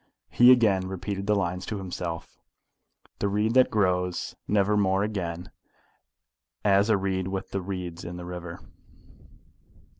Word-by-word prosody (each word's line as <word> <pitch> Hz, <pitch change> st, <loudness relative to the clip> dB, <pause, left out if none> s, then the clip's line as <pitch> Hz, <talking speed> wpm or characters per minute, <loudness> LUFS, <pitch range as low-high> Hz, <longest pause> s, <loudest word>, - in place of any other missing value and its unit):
He 120 Hz, +1 st, +7 dB
again 105 Hz, -7 st, +4 dB
repeated 95 Hz, +1 st, -4 dB
the 105 Hz, -, +3 dB
lines 90 Hz, -2 st, -1 dB
to 105 Hz, -, -3 dB
himself 90 Hz, -3 st, -6 dB, 0.8 s
The 100 Hz, -, 0 dB
reed 105 Hz, +3 st, +1 dB
that 130 Hz, 0 st, +5 dB
grows 90 Hz, -3 st, 0 dB
never 105 Hz, 0 st, +2 dB
more 95 Hz, -1 st, +2 dB
again 90 Hz, -5 st, -4 dB, 1.1 s
As 100 Hz, +1 st, +4 dB
a 110 Hz, -, +4 dB
reed 95 Hz, -1 st, -1 dB
with 95 Hz, 0 st, -4 dB
the 95 Hz, -, -2 dB
reeds 90 Hz, -2 st, -5 dB
in 85 Hz, +1 st, -6 dB
the 90 Hz, -, -7 dB
river. 90 Hz, -1 st, -7 dB
95 Hz, 140 wpm, -26 LUFS, 90-105 Hz, 1.1 s, He